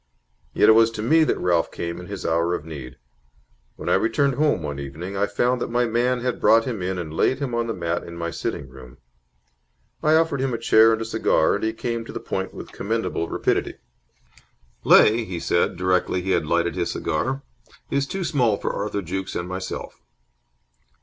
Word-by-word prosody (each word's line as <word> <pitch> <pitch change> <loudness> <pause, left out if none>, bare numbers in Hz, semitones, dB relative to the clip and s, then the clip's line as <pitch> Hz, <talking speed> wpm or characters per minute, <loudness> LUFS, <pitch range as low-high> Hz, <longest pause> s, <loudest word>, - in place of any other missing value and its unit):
Yet - - +3
it - - +9
was 115 +1 +6
to 105 - -3
me 160 +7 +4
that - - 0
Ralph 85 -2 +1
came 85 0 -5
in 90 - -9
his 100 -2 -6
hour 85 +1 +1
of 75 - -7
need. 70 -5 -8 0.8
When - - -9
I - - +3
returned 130 +5 +2
home 145 - +1
one 70 -2 -4
evening, 80 +8 -6
I 100 +1 +1
found 120 +4 0
that - - -2
my 120 +1 +1
man 120 +2 0
had 125 0 -2
brought 115 0 +5
him 115 -7 -4
in 90 +1 -2
and 80 -3 -5
laid 130 - +2
him 135 -4 -4
on 120 0 0
the 115 - -2
mat 85 -1 -2
in 85 0 -9
my 85 0 -3
sitting 70 - -4
room. 65 -2 -14 1.0
I 155 +1 +4
offered 160 -4 +2
him 130 -3 0
a - - -2
chair 115 0 +5
and 115 0 0
a - - -6
cigar, 110 -7 +2
and 100 - -2
he 110 - +1
came 115 +1 -3
to - - -8
the - - -5
point 95 0 -4
with - - -10
commendable 100 -5 -2
rapidity. - - -1 1.1
"Leigh," 115 +2 +6
he 90 -5 -5
said, 85 +2 0
directly 90 0 +1
he 95 - -1
had 75 - +1
lighted 85 +1 +1
his - - -2
cigar, 130 - -2 0.5
"is 140 0 0
too 195 +4 -3
small 125 -11 +1
for - - -3
Arthur 100 -1 -3
Jukes 95 +2 -4
and 85 - -3
myself." 95 +1 -6
100 Hz, 205 wpm, -23 LUFS, 85-120 Hz, 1.1 s, it